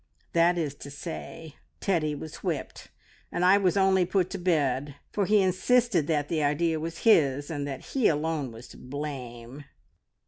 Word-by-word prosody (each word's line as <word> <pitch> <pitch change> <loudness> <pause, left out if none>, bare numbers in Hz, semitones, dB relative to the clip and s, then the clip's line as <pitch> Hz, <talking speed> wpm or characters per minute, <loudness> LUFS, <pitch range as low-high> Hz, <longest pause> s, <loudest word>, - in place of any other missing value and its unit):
That 170 +1 +4
is 155 -5 -1
to 140 - -9
say, 160 +1 -8 0.2
Teddy 160 -6 0
was 155 +2 -8
whipped, - - -4 0.4
and 180 - 0
I 195 +2 +6
was 190 -1 +2
only 190 -1 +4
put 185 0 0
to 195 - -4
bed, 145 -5 0 0.2
for 200 -3 0
he 210 -1 +5
insisted 190 - +2
that 150 -3 0
the 160 -1 -1
idea 155 +2 +1
was 165 +1 -6
his, 145 - +4
and 145 -2 -3
that 135 -2 -5
he 265 -5 +3
alone 150 -3 -1
was 115 +2 -11
to - - -13
blame." 130 -2 -7
160 Hz, 170 wpm, -27 LUFS, 145-185 Hz, 0.4 s, I